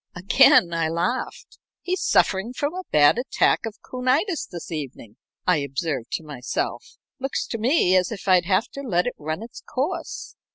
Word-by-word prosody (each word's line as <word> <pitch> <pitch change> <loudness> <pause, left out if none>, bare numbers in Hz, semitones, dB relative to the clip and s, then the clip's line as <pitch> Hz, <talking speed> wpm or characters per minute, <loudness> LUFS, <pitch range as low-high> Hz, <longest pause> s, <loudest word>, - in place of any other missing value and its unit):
Again 180 -1 +5
I 165 -1 0
laughed. 185 - -3 0.2
"He's 365 +1 -2
suffering 195 +5 +2
from 290 +4 -2
a 370 0 -6
bad 150 +9 +5
attack 245 -2 +1
of 220 - -8
coonitis 265 +8 0
this 175 -2 -8
evening," 135 -7 -7 0.3
I 180 -2 +4
observed 140 -2 -3
to - - -2
myself. 150 - -4 0.2
"Looks 270 +1 -2
to 230 - -3
me 225 - +3
as 185 +2 +2
if 200 -3 -7
I'd 180 -2 +5
have 190 +3 +2
to 280 - -8
let 180 -10 0
it 245 - -2
run 155 +6 -4
its 230 - -10
course." 325 +6 -4
190 Hz, 170 wpm, -23 LUFS, 165-260 Hz, 0.3 s, Again